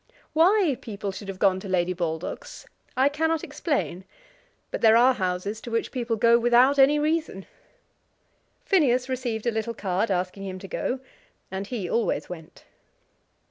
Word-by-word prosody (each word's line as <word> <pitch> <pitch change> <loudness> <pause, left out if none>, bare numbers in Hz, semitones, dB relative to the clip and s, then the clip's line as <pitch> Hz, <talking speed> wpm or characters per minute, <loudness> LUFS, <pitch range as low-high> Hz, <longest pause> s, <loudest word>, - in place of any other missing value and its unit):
Why 345 -1 +4
people 200 -2 -5
should 195 +1 -9
have 195 -1 -6
gone 190 -1 +3
to 195 - -8
Lady 180 -1 +1
Baldock's 175 - -5 0.3
I 265 +2 +5
cannot 320 +2 0
explain; 285 - -2 0.7
but - - -4
there 220 0 +6
are 255 +2 +6
houses 190 +1 -3
to - - -8
which 230 0 -1
people 240 -3 -2
go 235 +2 +4
without 245 +4 +4
any 280 +2 +6
reason. 305 - -1 1.2
Phineas 270 - +3
received 245 -4 -3
a 235 - +2
little 225 +1 -3
card 195 +2 -1
asking 185 +1 -2
him 185 -1 -5
to 195 - -9
go, 255 +6 -3 0.5
and 190 +1 -4
he 215 -7 -4
always 230 +5 -1
went. 165 -3 -10
230 Hz, 155 wpm, -25 LUFS, 190-270 Hz, 1.2 s, there